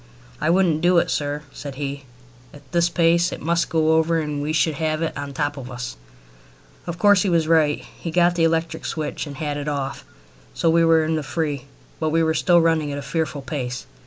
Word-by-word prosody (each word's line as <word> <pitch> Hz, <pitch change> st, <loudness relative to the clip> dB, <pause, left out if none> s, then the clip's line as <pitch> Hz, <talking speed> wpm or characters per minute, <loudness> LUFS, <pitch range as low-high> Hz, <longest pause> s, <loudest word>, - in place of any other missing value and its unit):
"I -, -, +1 dB
wouldn't 170 Hz, -3 st, +3 dB
do 175 Hz, 0 st, +4 dB
it, -, -, +2 dB
sir," 145 Hz, 0 st, -2 dB
said 140 Hz, -2 st, -7 dB
he. 140 Hz, 0 st, -5 dB, 0.5 s
"At 140 Hz, -2 st, -17 dB
this 170 Hz, 0 st, +2 dB
pace 170 Hz, +1 st, +3 dB
it -, -, -6 dB
must 170 Hz, +1 st, 0 dB
go 160 Hz, -1 st, +2 dB
over 165 Hz, +1 st, +2 dB
and 150 Hz, -2 st, -3 dB
we 150 Hz, +2 st, -2 dB
should 160 Hz, 0 st, +2 dB
have 155 Hz, 0 st, 0 dB
it 165 Hz, -, -2 dB
on 145 Hz, 0 st, -4 dB
the 140 Hz, -, -9 dB
top 145 Hz, +1 st, -1 dB
of 130 Hz, -2 st, -7 dB
us." 125 Hz, -, -6 dB, 0.9 s
Of 170 Hz, -1 st, -4 dB
course 200 Hz, +1 st, +5 dB
he 195 Hz, -, +1 dB
was 165 Hz, -2 st, +2 dB
right. 160 Hz, -3 st, +2 dB
He 170 Hz, -, -4 dB
got 175 Hz, +1 st, +4 dB
to 175 Hz, -, -6 dB
the 165 Hz, -, +2 dB
electric 165 Hz, 0 st, 0 dB
switch 155 Hz, -1 st, -4 dB
and 140 Hz, -, -7 dB
had 145 Hz, -2 st, -3 dB
it 145 Hz, 0 st, -5 dB
off, 140 Hz, -2 st, -3 dB, 0.5 s
so 165 Hz, -, +2 dB
we 165 Hz, 0 st, +4 dB
were 165 Hz, -1 st, +4 dB
in 160 Hz, 0 st, 0 dB
the -, -, -1 dB
free; 145 Hz, -2 st, -3 dB, 0.3 s
but 155 Hz, -, 0 dB
we 165 Hz, +1 st, +2 dB
were 160 Hz, 0 st, +2 dB
still 175 Hz, +2 st, +4 dB
running 160 Hz, -3 st, +1 dB
at 140 Hz, -, -4 dB
a 145 Hz, -, -5 dB
fearful 155 Hz, -2 st, -2 dB
pace. 125 Hz, -4 st, -4 dB
160 Hz, 230 wpm, -22 LUFS, 145-165 Hz, 0.9 s, course